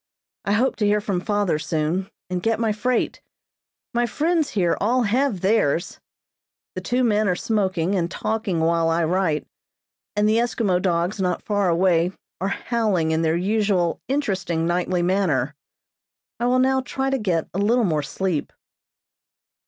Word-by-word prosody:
I 200 - +1
hope 245 +5 +1
to 210 - +1
hear 210 +1 +3
from 200 -4 -2
father 205 -6 0
soon, 160 +5 -1 0.2
and 180 -1 -3
get 225 +1 0
my 225 -2 +1
freight. 235 +3 -1 0.7
My 240 0 +1
friends 315 +5 0
here 180 -5 +1
have - - 0
all 245 +4 +2
theirs. 205 - +1 0.7
The - - -5
two 250 +1 0
men 215 -2 +2
are 180 - +2
smoking 190 -4 0
and 175 -3 0
talking 215 -3 -2
while 165 0 +2
I 165 +1 +1
write, 165 -2 0 0.7
and 210 0 +2
the 215 +1 +3
Eskimo 220 -6 +1
dogs 180 +2 0
not 180 -2 -1
far 205 -3 +1
away 175 0 +2 0.3
are 190 - -1
howling 200 -6 0
in 160 0 +1
their 160 0 +1
usual 195 -3 +1
interesting 190 - -1
nightly 175 +1 0
manner. 175 -8 +1 0.9
I 240 - +1
will 250 +1 +3
now 265 +1 +3
try 265 +1 -2
to 270 - 0
get 175 -7 0
a 190 - -2
little 230 +4 +3
more 155 -5 +1
sleep." 170 +2 -2
195 Hz, 160 wpm, -23 LUFS, 170-225 Hz, 0.9 s, hear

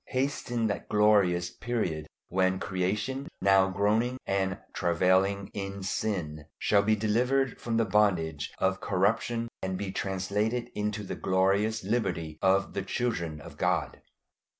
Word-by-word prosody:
Hasten 130 -3 -1
that 105 -2 -2
glorious 100 -5 +3
period 90 -11 -2 0.2
when 95 +1 +1
creation, 105 +10 -2
now 95 -1 +4
groaning 105 +6 +1
and 95 -1 0 0.2
travailing 95 +3 +2
in 100 -1 -5
sin, 90 -7 -2
shall 100 -1 +3
be 110 +2 +3
delivered 125 +5 +1
from 115 -1 -1
the 115 - +3
bondage 90 -8 +1
of 95 0 0
corruption 115 +5 +1
and 95 0 -2
be 100 0 -4
translated 105 +6 -1
into 105 0 -2
the 95 - -5
glorious 100 +4 +1
liberty 90 -8 -2
of 95 0 +2
the 100 - -1
children 95 -7 -2
of - - -11
God. - - 0
100 Hz, 130 wpm, -29 LUFS, 95-110 Hz, 0.2 s, now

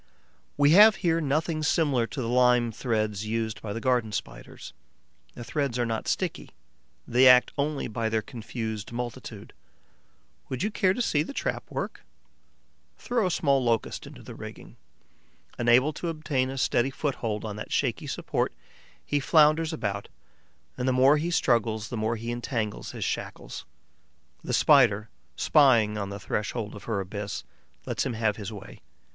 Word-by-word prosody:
We 145 0 +5
have 210 +4 +8
here 165 -1 +2
nothing 155 +2 0
similar 145 -6 +2
to 135 - -5
the - - -3
lime 125 -1 +3
threads 110 -3 -2
used 110 0 -2
by 105 - -5
the 115 - -3
Garden 120 -3 +1
Spiders. - - -7 0.6
The 120 - -7
threads 140 -1 -2
are 120 - +1
not 115 -1 -3
sticky; - - -2 0.6
they 125 +2 +5
act 125 0 +6
only 145 0 -1
by 110 0 -2
their 110 -1 0
confused 110 -2 -6
multitude. 120 0 -6 1.0
Would 130 +5 -3
you 210 - 0
care 185 -2 +2
to 250 - 0
see 150 -9 +1
the 225 - -5
trap - - -2
at - - -31
work? - - -4 1.0
Throw 240 -6 0
a - - 0
small 140 -6 +2
Locust 115 -2 -1
into - - -12
the - - -9
rigging. - - -10 0.8
Unable 120 +5 +4
to 170 - -5
obtain 150 -5 -1
a 135 - -5
steady 125 0 +1
foothold 120 -7 -3
on 105 -2 -5
that 105 - -7
shaky - - -1
support, - - -1 0.5
he 145 - 0
flounders 155 +3 +4
about; 110 -11 -3 0.7
and 125 - -1
the 130 - +3
more 135 +4 +5
he 165 +3 -2
struggles 115 -8 +1
the 125 - -4
more 110 +1 -1
he 115 +1 -5
entangles 120 -3 -3
his - - -4
shackles. - - -5 0.8
The - - -4
Spider, 105 +2 +4 0.3
spying 120 -8 +4
on 100 -2 -3
the 100 0 -6
threshold 105 +2 -3
of 105 - -10
her 110 -4 -1
abyss, 100 +2 -5 0.4
lets - - -1
him 130 - -2
have 110 -2 0
his 105 0 -6
way. 100 -2 -11
120 Hz, 165 wpm, -27 LUFS, 110-145 Hz, 1.0 s, have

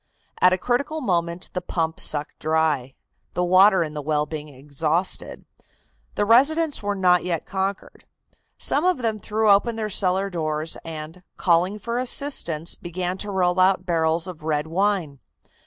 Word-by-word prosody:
At 180 - +6
a 185 - +2
critical 250 - -1
moment 175 - -2
the 180 - -2
pump 165 -2 -2
sucked 150 -1 0
dry, 155 -5 0 0.4
the 180 - +1
water 185 +1 +5
in 155 -2 -6
the 150 - -4
well 150 0 0
being 150 -1 -7
exhausted. 150 +6 -3 0.7
The 205 - +1
residents 290 +7 +3
were 205 0 -2
not 180 -2 +3
yet 170 -3 -2
conquered. 195 0 -4 0.5
Some 290 - +1
of 365 -1 +2
them 220 -2 -1
threw 215 +1 +1
open 220 +4 +3
their 215 -2 -3
cellar 190 +1 +1
doors 155 -2 -2
and, 160 +2 -8 0.2
calling 180 +3 +2
for 235 +3 -3
assistance, 240 - 0
began 180 +1 -4
to 205 - -4
roll 185 -2 +1
out 185 +1 +3
barrels 165 -1 +1
of 180 -5 -8
red 155 -1 -1
wine. 175 -4 -1
180 Hz, 155 wpm, -23 LUFS, 160-205 Hz, 0.7 s, At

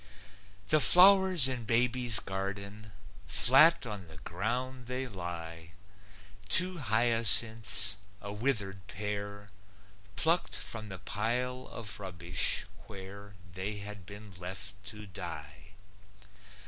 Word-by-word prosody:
The 155 - +3
flowers 185 -3 +7
in 125 -3 -4
baby's 120 0 +3
garden, 100 +2 -7 0.4
Flat 130 - +5
on 105 -6 -8
the 80 0 -14
ground 120 +9 -6
they 125 +1 -4
lie, 85 -5 -8 0.8
Two 180 +7 +3
hyacinths, 115 -3 +3 0.2
a 100 0 -8
withered 105 -5 -3
pair, 100 0 -7 0.7
Plucked 165 +3 -1
from 110 -2 -6
the 95 - -8
pile 125 +6 -4
of 105 -3 -7
rubbish, 90 -1 -1 0.2
where 100 0 -12 0.2
They 95 +3 -5
had 100 -3 -9
been 100 +1 -11
left 95 +3 -8
to 105 0 -8
die. 75 -1 -10
105 Hz, 105 wpm, -29 LUFS, 95-125 Hz, 0.8 s, flowers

